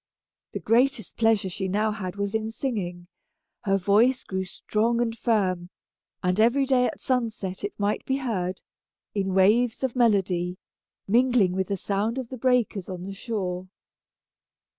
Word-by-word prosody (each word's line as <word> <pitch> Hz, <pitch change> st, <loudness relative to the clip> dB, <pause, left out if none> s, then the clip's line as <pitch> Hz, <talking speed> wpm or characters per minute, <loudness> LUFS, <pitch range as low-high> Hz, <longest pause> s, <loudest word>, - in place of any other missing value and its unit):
The -, -, -3 dB
greatest 240 Hz, -2 st, +1 dB
pleasure 225 Hz, -3 st, +2 dB
she 190 Hz, +1 st, -3 dB
now 210 Hz, +3 st, +1 dB
had 190 Hz, -4 st, -5 dB
was 200 Hz, 0 st, -2 dB
in 220 Hz, 0 st, -1 dB
singing. 195 Hz, -8 st, -4 dB, 0.6 s
Her 195 Hz, -1 st, +3 dB
voice 215 Hz, +7 st, +3 dB
grew 190 Hz, 0 st, -3 dB
strong 220 Hz, +5 st, 0 dB
and 230 Hz, -1 st, 0 dB
firm, 190 Hz, -7 st, 0 dB, 0.5 s
and 180 Hz, +2 st, +1 dB
every 240 Hz, +5 st, +4 dB
day 255 Hz, -2 st, +3 dB
at 305 Hz, -, -5 dB
sunset 225 Hz, -7 st, -2 dB
it 205 Hz, -, -5 dB
might 205 Hz, +1 st, 0 dB
be 265 Hz, -, +1 dB
heard, 190 Hz, -9 st, -3 dB, 0.5 s
in 195 Hz, -2 st, -1 dB
waves 220 Hz, +6 st, +3 dB
of 260 Hz, -2 st, -1 dB
melody, 190 Hz, -7 st, +2 dB, 0.5 s
mingling 240 Hz, -3 st, +4 dB
with 190 Hz, 0 st, -1 dB
the 200 Hz, -, -1 dB
sound 205 Hz, +6 st, -1 dB
of 255 Hz, -3 st, -4 dB
the 260 Hz, -, -6 dB
breakers 240 Hz, -7 st, +1 dB
on 180 Hz, -1 st, -5 dB
the 195 Hz, +1 st, -6 dB
shore. 190 Hz, -4 st, -4 dB
210 Hz, 155 wpm, -26 LUFS, 190-235 Hz, 0.6 s, every